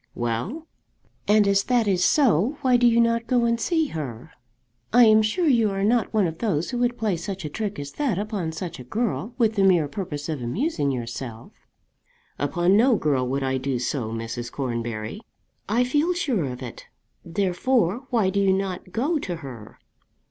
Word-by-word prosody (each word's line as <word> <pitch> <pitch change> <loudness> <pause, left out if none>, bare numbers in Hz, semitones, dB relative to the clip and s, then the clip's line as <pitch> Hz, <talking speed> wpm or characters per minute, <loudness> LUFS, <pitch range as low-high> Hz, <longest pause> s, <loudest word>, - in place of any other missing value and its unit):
"Well?" 120 - -3 0.6
"And 210 0 +4
as 200 0 +4
that 245 -3 +2
is 185 -3 +2
so, 255 - +3
why 255 -1 +4
do 245 0 +5
you 235 0 +4
not 230 0 +2
go 245 -2 +2
and 235 0 +1
see 320 +2 +1
her? 130 - -6 0.6
I 245 +2 +7
am 220 -1 +6
sure 220 +12 0
you 230 -6 +4
are 195 0 -2
not 230 +2 +2
one 215 -3 +2
of 165 -1 -4
those 175 - -1
who 245 - -2
would 245 0 +1
play 215 -4 0
such 190 +1 -5
a - - -3
trick 210 +2 -3
as 140 0 -6
that 265 - -1
upon 205 -5 -3
such 170 -1 -6
a - - -8
girl 220 - -2
with 225 -3 +2
the 200 -2 +1
mere 175 -6 +4
purpose 145 -3 -5
of 155 -5 -3
amusing 160 - -1
yourself." 120 -2 -5 0.9
"Upon 175 +7 +2
no 240 +3 +5
girl 140 -8 0
would 135 +2 -1
I 130 0 0
do 130 -1 -1
so, 120 -1 -2
Mrs. 115 +1 -5
Cornbury." 120 - -4 0.5
"I 235 +4 +3
feel 295 +8 +1
sure 255 - 0
of 125 0 -6
it. 120 - -9 0.4
Therefore 200 +6 0
why 220 -6 +2
do 200 - 0
you 195 -1 +3
not 190 -1 -3
go 290 - 0
to 180 -9 -4
her?" 115 -5 -10
195 Hz, 190 wpm, -24 LUFS, 140-235 Hz, 0.9 s, I